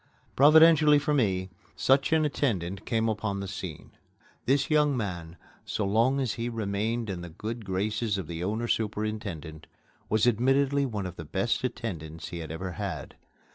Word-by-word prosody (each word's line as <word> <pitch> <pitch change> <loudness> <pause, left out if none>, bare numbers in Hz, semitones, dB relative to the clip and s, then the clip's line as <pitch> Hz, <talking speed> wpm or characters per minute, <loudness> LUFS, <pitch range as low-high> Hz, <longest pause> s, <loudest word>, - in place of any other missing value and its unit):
Providentially 155 +1 +7
for 145 +1 0
me, 95 -8 +1 0.2
such 135 +2 +3
an 160 -1 +3
attendant 100 - -2
came 115 -1 +1
upon 105 -2 -2
the 100 - -4
scene. 95 -4 -7 0.6
This 140 +2 +3
young 150 -3 +3
man, 90 -6 -4 0.3
so 105 - -2
long 115 +7 +2
as 125 -6 0
he 120 +1 -3
remained 110 +1 -2
in 95 -3 -4
the 85 - -7
good 110 +7 -6
graces 105 +3 -1
of 95 - -4
the 85 +1 -5
owner 110 +5 -1
superintendent, 105 -8 -3 0.4
was 110 +1 +3
admittedly 135 +4 +2
one 105 -5 -4
of 90 -1 -7
the 80 - -6
best 95 +12 -1
attendants 85 -10 -5
he 85 - -6
had 80 -2 -6
ever 90 +3 -4
had. 90 -6 -5
110 Hz, 165 wpm, -28 LUFS, 95-125 Hz, 0.6 s, Providentially